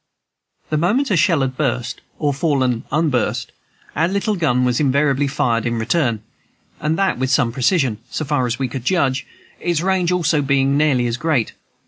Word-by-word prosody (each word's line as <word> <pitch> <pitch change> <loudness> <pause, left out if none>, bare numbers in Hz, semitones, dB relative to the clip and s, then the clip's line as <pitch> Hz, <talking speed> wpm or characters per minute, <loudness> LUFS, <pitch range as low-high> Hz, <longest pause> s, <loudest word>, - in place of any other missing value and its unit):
The 155 - +1
moment 225 - +1
a - - +3
shell 165 -2 +3
had 130 -1 -1
burst 125 -2 -2 0.2
or 145 -2 0
fallen 130 -5 0
unburst, 130 -6 0 0.4
our 165 - +2
little 200 +3 -1
gun 125 -8 +1
was 125 -1 +1
invariably 140 0 +2
fired 120 -4 0
in 120 -1 -1
return, 115 -2 0 0.6
and 155 +1 -1
that 195 -8 +1
with 130 0 0
some 130 -3 +2
precision, 130 - +1
so 155 - -3
far 135 -3 0
as 120 0 -2
we 135 - -1
could 125 0 -6
judge, 135 -4 0 0.3
its 170 -2 0
range 185 -1 +1
also 170 -4 +1
being 140 0 +2
nearly 140 -5 +2
as 120 0 -1
great. 150 -6 0
140 Hz, 175 wpm, -19 LUFS, 125-165 Hz, 0.6 s, a